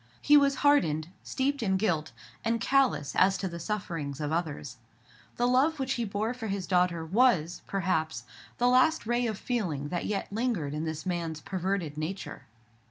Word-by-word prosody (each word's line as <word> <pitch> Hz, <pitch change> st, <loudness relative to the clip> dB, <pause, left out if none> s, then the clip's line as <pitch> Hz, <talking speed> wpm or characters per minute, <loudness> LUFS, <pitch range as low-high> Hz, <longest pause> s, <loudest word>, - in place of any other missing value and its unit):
He 295 Hz, -, +5 dB
was 280 Hz, -1 st, +5 dB
hardened, 160 Hz, -, +3 dB
steeped 275 Hz, +1 st, -1 dB
in 190 Hz, -4 st, +1 dB
guilt, 165 Hz, -6 st, 0 dB, 0.3 s
and 230 Hz, 0 st, +1 dB
callous 265 Hz, -, +2 dB
as 190 Hz, +1 st, +4 dB
to 190 Hz, -, -2 dB
the 170 Hz, -1 st, -6 dB
sufferings 165 Hz, -7 st, -4 dB
of 150 Hz, -1 st, -2 dB
others. 150 Hz, -6 st, -3 dB, 0.6 s
The 240 Hz, -, +1 dB
love 270 Hz, +6 st, +3 dB
which 265 Hz, 0 st, 0 dB
he 240 Hz, -2 st, -2 dB
bore 215 Hz, +3 st, -2 dB
for 245 Hz, -3 st, -6 dB
his 195 Hz, -2 st, -2 dB
daughter 180 Hz, -2 st, +1 dB
was, 180 Hz, -4 st, +2 dB
perhaps, 170 Hz, -5 st, -1 dB, 0.3 s
the 245 Hz, -, +2 dB
last 255 Hz, +5 st, +4 dB
ray 240 Hz, +1 st, +1 dB
of 215 Hz, -3 st, -3 dB
feeling 170 Hz, -, -2 dB
that 175 Hz, +1 st, -2 dB
yet 200 Hz, -1 st, -3 dB
lingered 210 Hz, -, -1 dB
in 155 Hz, +2 st, -3 dB
this 160 Hz, 0 st, -4 dB
man's 170 Hz, -3 st, -2 dB
perverted 185 Hz, -4 st, -3 dB
nature. 180 Hz, +5 st, -5 dB
190 Hz, 170 wpm, -29 LUFS, 160-240 Hz, 0.6 s, He